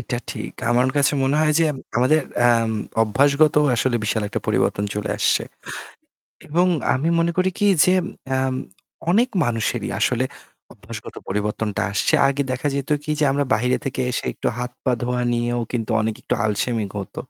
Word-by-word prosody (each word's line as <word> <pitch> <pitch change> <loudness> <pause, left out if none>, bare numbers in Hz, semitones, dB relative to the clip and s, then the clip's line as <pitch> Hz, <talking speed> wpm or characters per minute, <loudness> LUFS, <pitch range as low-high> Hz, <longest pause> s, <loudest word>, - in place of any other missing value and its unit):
এটা 120 +1 -3
ঠিক। - - -6 0.2
আমার 125 +2 +3
কাছে 140 0 +3
মনে 135 +2 +1
হয় 155 -1 +3
যে 165 - +4
এম 135 - -8 0.2
আমাদের 130 +6 +4 0.2
অ্যাম 115 -2 +4 0.3
অভ্যাসগত 140 +7 +3 0.2
আসলে 125 0 +1
বিশাল 110 +1 0
একটা - - -3
পরিবর্তন 100 - +1
চলে 105 0 -3
আসছে। - - +2 1.1
এবং 175 +4 +2 0.3
আমি 140 +5 0
মনে 170 +1 +2
করি 185 +1 +3
কি 205 - +1 0.2
যে 185 - +4 0.4
অ্যাম 130 0 0 0.6
অনেক 235 +7 +3 0.2
মানুষেরই 115 -2 -1
আসলে - - +1 0.5
অভ্যাসগত - - -10
পরিবর্তনটা 105 +1 -2
আসছে। 100 0 0
আগে 140 +1 0
দেখা 130 +3 -1
যেত 140 +1 -3
কি 155 - -9
যে 150 - +2
আমরা 140 0 0
বাইরে 125 +4 +1
থেকে 130 -1 -2
এসে 125 - -3
একটু - - -3
হাত, 125 0 -3
পা 130 - +2
ধোয়া 125 0 -1
নিয়েও 120 0 0
কিন্তু 115 -2 -2
অনেক 110 0 -1
একটু - - -2
আলসেমি 110 +1 0
হত। 100 - -7
125 Hz, 170 wpm, -22 LUFS, 115-145 Hz, 1.1 s, যে